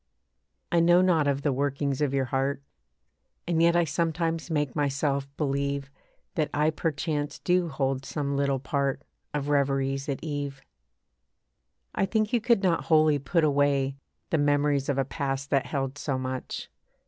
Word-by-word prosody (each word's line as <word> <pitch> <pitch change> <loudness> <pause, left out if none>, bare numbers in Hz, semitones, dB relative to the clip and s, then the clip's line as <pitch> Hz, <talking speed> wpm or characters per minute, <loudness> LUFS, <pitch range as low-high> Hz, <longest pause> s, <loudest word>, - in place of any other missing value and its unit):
I 170 - +4
know 175 +2 +5
not 165 -5 +3
of 140 0 0
the 145 - +2
workings 140 +1 -1
of 145 -3 +2
your 135 -1 +1
heart; 135 +2 -1 0.8
And 165 -2 +1
yet 170 0 +5
I 175 - +4
sometimes 165 +1 -1
make 150 -5 -1
myself 140 -1 0
believe 140 -1 -1 0.4
That 155 -5 0
I 150 +2 +3
perchance 150 -2 -2
do 180 -1 +1
hold 135 -2 -1
some 140 0 -2
little 140 -1 +1
part 140 +1 -1 0.3
Of 145 -1 -2
reveries 135 -1 +1
at 135 - -3
eve. 145 -3 -4 1.3
I 195 - +1
think 215 +2 0
you 240 - +3
could 230 -3 +3
not 175 -3 +1
wholly 155 -2 +4
put 160 +5 +1
away 140 -2 +2 0.4
The 160 - +2
memories 145 -1 +2
of 140 - +1
a 135 - +1
past 135 -1 -3
that 135 -2 +2
held 135 0 -3
so 140 -3 -1
much. 130 0 -5
145 Hz, 160 wpm, -27 LUFS, 135-160 Hz, 1.3 s, know